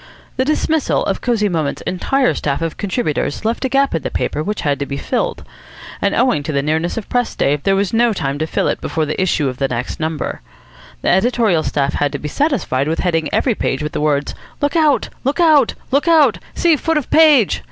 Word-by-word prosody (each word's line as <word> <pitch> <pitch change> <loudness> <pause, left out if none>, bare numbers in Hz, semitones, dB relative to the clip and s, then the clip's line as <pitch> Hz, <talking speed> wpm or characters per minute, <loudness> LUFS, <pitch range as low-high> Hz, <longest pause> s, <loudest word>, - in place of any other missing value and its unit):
The 260 - 0
dismissal 310 +1 0
of - - -2
Cosy 230 -4 +1
Moments' 160 -6 -2
entire 255 +8 +1
staff 145 +2 -2
of 165 - -3
contributors 195 - -2
left 230 +4 -1
a - - 0
gap 275 +2 +2
in 165 - -1
the - - -3
paper 150 - -2
which 210 +5 -3
had 145 -1 0
to 140 - -3
be 140 - -4
filled, 250 - -2 0.6
and - - +1
owing 250 - +2
to 145 - -4
the 140 -1 0
nearness 160 +5 -1
of 220 - -5
press 245 -1 -1
day 140 - +2
there 195 +7 +1
was 195 +1 -1
no 235 +1 +3
time 140 -8 -3
to 155 - -1
fill - - 0
it - - -2
before 160 -1 -1
the 155 +4 -2
issue 165 -6 +1
of 130 -1 -4
the 135 - 0
next 125 0 -4
number. 160 -1 -3 0.6
The - - +1
editorial 210 -3 +2
staff 140 -2 -1
had 145 -1 0
to - - -2
be 150 - -6
satisfied 195 - 0
with 160 - -1
heading 165 -4 0
every 250 - +1
page 155 - -2
with 150 - -3
the - - -3
words 145 -1 0 0.3
"Look 290 +3 -1
out! 310 -4 +2
Look 275 +6 -1
out!! 310 -7 +4 0.2
Look 280 +5 +1
out!!! 320 -3 +4 0.2
See 335 -2 +3
foot 325 +2 0
of 295 - -3
page!!!!" 300 -9 +5
190 Hz, 225 wpm, -18 LUFS, -, 0.6 s, page